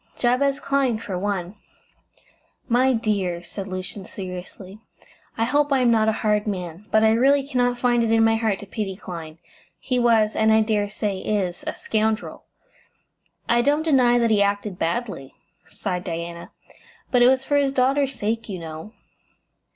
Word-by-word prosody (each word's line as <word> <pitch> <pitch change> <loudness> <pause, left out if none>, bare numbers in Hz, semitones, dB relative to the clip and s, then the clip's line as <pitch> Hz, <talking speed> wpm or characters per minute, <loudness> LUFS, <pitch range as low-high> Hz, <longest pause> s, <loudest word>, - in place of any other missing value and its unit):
"Jabez 270 +3 +1
Clyne, 275 -4 0
for 210 -4 -6
one." 190 -1 -2 1.1
"My 255 +2 +3
dear," 200 -7 -1
said 195 +3 -7
Lucian, 185 +1 -6
seriously, 185 +1 -8 0.6
"I 225 - +1
hope 285 +5 +1
I 270 -2 +3
am 245 -2 +4
not 220 -1 +3
a - - +4
hard 210 0 +2
man, 180 0 -5
but 220 0 +3
I 220 - +5
really 270 +4 +3
cannot 245 -2 +1
find 240 -1 +2
it 230 -1 +1
in 225 0 +4
my 225 0 +4
heart 220 -3 0
to - - -8
pity 200 -1 -4
Clyne. 165 -5 -8 0.4
He 250 -2 -1
was 225 -3 +3
and 220 0 +3
I 220 0 +5
dare 210 -2 0
say 205 -2 -3
is 190 -4 -2
a - - -2
scoundrel!" 220 0 -2 1.0
"I 235 0 +3
don't 290 +4 +2
deny 255 -6 +4
that 235 -1 +2
he 210 -2 +3
acted 200 -1 -1
badly," 170 - -3 0.3
sighed 180 0 -4
Diana, 170 0 -6 0.6
"but 245 - +3
it 245 - +7
was 260 +1 +3
for 285 +1 +1
his 280 -1 +2
daughter's 270 +1 +1
sake, 225 +1 -3
you 190 - -4
know." 160 +5 -8
220 Hz, 170 wpm, -23 LUFS, 190-245 Hz, 1.1 s, it